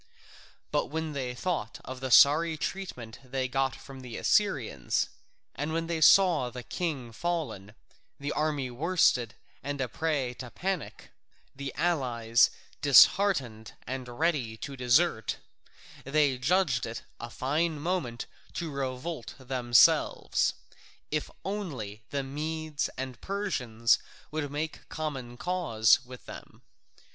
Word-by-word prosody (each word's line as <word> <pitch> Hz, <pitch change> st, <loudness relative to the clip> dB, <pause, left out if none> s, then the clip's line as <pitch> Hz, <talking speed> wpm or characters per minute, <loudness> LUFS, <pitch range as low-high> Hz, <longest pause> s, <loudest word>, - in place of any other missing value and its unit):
But -, -, +1 dB
when 160 Hz, +1 st, -3 dB
they 125 Hz, -3 st, -3 dB
thought 145 Hz, -, -3 dB
of 130 Hz, 0 st, -7 dB
the 130 Hz, 0 st, -3 dB
sorry 155 Hz, +6 st, +6 dB
treatment 140 Hz, -13 st, -5 dB
they 130 Hz, 0 st, -2 dB
got 135 Hz, +1 st, 0 dB
from 135 Hz, 0 st, -11 dB
the 125 Hz, -3 st, -7 dB
Assyrians 130 Hz, -, +1 dB, 0.4 s
and 150 Hz, +2 st, -3 dB
when 165 Hz, 0 st, 0 dB
they 165 Hz, -1 st, -2 dB
saw 170 Hz, -7 st, +6 dB
the 125 Hz, 0 st, -8 dB
king 140 Hz, -9 st, -3 dB
fallen, 125 Hz, -, -3 dB, 0.4 s
the 140 Hz, +1 st, -3 dB
army 150 Hz, -4 st, -1 dB
worsted 130 Hz, -5 st, +2 dB, 0.3 s
and 145 Hz, +1 st, -4 dB
a 135 Hz, -, 0 dB
prey 140 Hz, -3 st, -1 dB
to 125 Hz, -, -6 dB
panic, 185 Hz, +3 st, -4 dB, 0.4 s
the 140 Hz, 0 st, -5 dB
allies 125 Hz, -8 st, +2 dB, 0.3 s
disheartened 140 Hz, -, +5 dB
and 125 Hz, -1 st, -6 dB
ready 145 Hz, -9 st, 0 dB
to 140 Hz, +4 st, -6 dB
desert, 125 Hz, -, +2 dB, 0.7 s
they 140 Hz, -2 st, +2 dB
judged 145 Hz, -4 st, +2 dB
it 115 Hz, 0 st, -6 dB, 0.2 s
a 120 Hz, -, -6 dB
fine 150 Hz, +6 st, -1 dB
moment 145 Hz, -8 st, -2 dB, 0.3 s
to 165 Hz, -3 st, -4 dB
revolt 135 Hz, +1 st, -4 dB
themselves, 125 Hz, -3 st, +3 dB, 0.6 s
if 150 Hz, 0 st, -1 dB, 0.2 s
only 140 Hz, -, -4 dB
the 140 Hz, -1 st, -2 dB
Medes 155 Hz, +2 st, -3 dB
and 130 Hz, -2 st, -5 dB
Persians 125 Hz, -, +1 dB, 0.3 s
would 155 Hz, -2 st, -2 dB
make 150 Hz, +2 st, -5 dB
common 135 Hz, -6 st, -5 dB
cause 135 Hz, -9 st, +3 dB
with 125 Hz, 0 st, -12 dB
them. -, -, -11 dB
135 Hz, 125 wpm, -29 LUFS, 125-160 Hz, 0.7 s, sorry